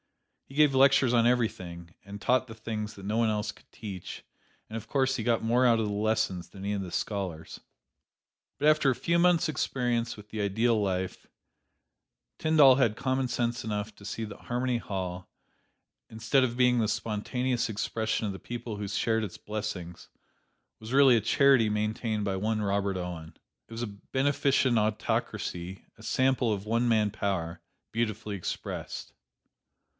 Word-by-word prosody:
He 135 - -13
gave 150 -2 +5
lectures 135 -2 +5
on 120 -1 +4
everything, 90 -8 -1
and 100 +1 -9
taught 130 +4 +2
the 115 - -9
things 110 -1 -5
that 95 - -10
no 105 +2 -1
one 115 -1 +3
else 105 -1 -1
could - - -23
teach, 95 -5 -8 0.4
and 110 - -8
of 115 - -6
course 135 -1 +1
he 120 - -3
got 115 -1 +1
more 120 +3 +3
out 115 -2 +5
of 110 - +1
the 105 - -2
lessons 105 -4 0
than 100 -1 -9
any 100 - 0
of 100 - -2
the 90 -2 -6
scholars. 90 -7 -4 1.0
But 150 - +1
after 155 -2 +5
a 130 - +2
few 170 +6 +1
months' 175 -1 +4
experience 120 -5 -1
with 105 0 -13
the 110 -1 -4
ideal 110 +3 +2
life, 95 -2 -2 1.1
Tyndall 150 -4 +6
had 120 -5 +2
commonsense 125 -2 -1
enough 105 -1 -3
to - - -16
see 110 +2 -4
that 105 - -8
Harmony 125 0 -1
Hall, 90 -4 -5 0.8
instead 110 +4 +2
of 120 -1 -1
being 125 -1 +4
the 110 - +2
spontaneous 115 +4 -1
expression 110 +1 -1
of 100 - -2
the 95 - -8
people 120 -2 -6
who 100 0 -4
shared 110 +2 0
its 100 -5 -6
blessings, 100 -5 -6 0.7
was 110 +1 -9
really 135 -2 +6
a 115 - +2
charity 130 0 +4
maintained 105 0 -1
by 100 -1 -1
one 110 +3 -1
Robert 100 -1 0
Owen. 85 -3 -6 0.3
It - - -23
was 115 +1 -4
a - - -2
beneficent 130 +3 +1
autocracy, 95 -3 -2
a 110 - -15
sample 130 0 +2
of 100 -1 -2
one 115 +2 +1
man 110 -2 +3
power, 95 -6 -2 0.3
beautifully 110 -2 -2
expressed. 95 - -5
110 Hz, 170 wpm, -29 LUFS, 100-125 Hz, 1.1 s, Tyndall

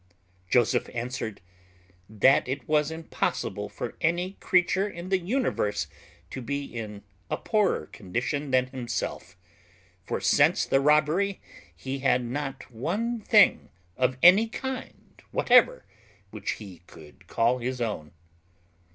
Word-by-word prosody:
Joseph 120 +1 +2
answered, 120 -3 -4 0.7
"That 110 +7 +4
it 135 0 -4
was 150 -1 +2
impossible 160 0 -3
for - - -6
any 175 +3 +1
creature 185 +2 +2
in 175 -1 -8
the 190 -1 +2
universe 185 - -1 0.5
to 130 - -5
be 140 +3 -3
in 105 -5 -7 0.3
a - - -1
poorer 210 - +1
condition 120 - -3
than 130 -1 +3
himself; 125 -7 -5 0.7
for - - -3
since - - +3
the 135 - +2
robbery 155 +7 +2 0.4
he 135 +1 -5
had 130 -2 +2
not 135 +2 -5
one 205 - -2
thing 210 -1 +4 0.3
of 130 +2 +1
any 190 +6 +8
kind 265 +3 -7
whatever - - +4 0.5
which - - -3
he 95 -6 -11
could 75 -2 -16
call 120 +2 +1
his 125 +1 -3
own." 105 -10 -3
135 Hz, 125 wpm, -27 LUFS, 120-180 Hz, 0.7 s, any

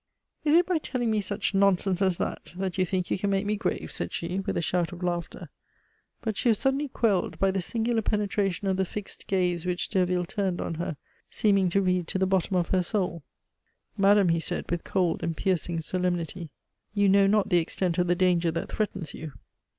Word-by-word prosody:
"Is 300 0 +4
it 350 +1 +6
by 355 -3 +1
telling 245 -6 -2
me 215 -1 +1
such 205 +1 -2
nonsense 195 -1 +2
as 190 -3 +2
that - - -4
that 190 0 -3
you 185 - +4
think 185 0 -2
you - - +1
can 200 - 0
make 195 +1 +1
me 210 +1 0
grave?" 215 - -2
said - - -3
she 175 +3 -3
with 195 - -2
a - - +2
shout 175 0 0
of 180 0 -8
laughter. 175 -2 -3 0.7
But 220 -3 -1
she 245 - +2
was 220 - +4
suddenly 270 +5 +1
quelled 220 -7 0
by 195 0 +2
the 190 0 -1
singular 225 +4 0
penetration 205 -3 -1
of 190 -1 +1
the 190 - +2
fixed 200 +2 -7
gaze 180 -3 +1
which 180 -1 -2
Derville 180 -1 +1
turned 190 -1 -2
on - - -3
her, 160 -2 -4 0.3
seeming 200 -3 +2
to 195 +3 +2
read 180 -2 +1
to - - -2
the 190 - +2
bottom 190 0 +1
of 175 -2 +1
her 185 - +3
soul. 180 -3 -1 0.7
"Madame," 200 -1 +5
he 165 0 +2
said 165 - -4
with 175 -1 -1
cold 180 -4 0
and 165 -2 -2
piercing 175 -3 0
solemnity, 175 -1 -2 0.5
"you 205 -1 +4
know 195 0 +5
not 205 0 +2
the 175 -3 +4
extent 170 +1 -1
of 180 - +2
the 175 - +3
danger 175 -2 +2
that 165 +1 -3
threatens 195 -7 -3
you. 155 -2 -7
190 Hz, 210 wpm, -27 LUFS, 175-200 Hz, 0.7 s, it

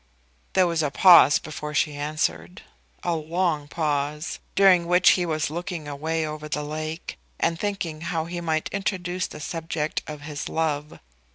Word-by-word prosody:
There 185 - +5
was 170 -2 0
a 150 - +1
pause 170 -3 +7
before 150 0 -6
she 150 -1 +2
answered, 115 - -2 0.4
a 175 - 0
long 160 -1 -1
pause, 150 0 -2 0.2
during 185 -3 +5
which 180 +1 +6
he 180 -2 +1
was 155 -2 -1
looking 175 -2 -5
away 160 +3 -2
over 155 0 -6
the 150 0 -2
lake, 155 +2 -5 0.2
and 165 0 0
thinking 180 -7 -3
how 165 -1 -2
he 175 +1 -5
might 160 -2 -1
introduce 185 -2 -2
the - - -10
subject 160 0 -3
of 150 -1 -7
his 150 -1 -6
love. 150 -2 -2
160 Hz, 160 wpm, -25 LUFS, 150-175 Hz, 0.4 s, pause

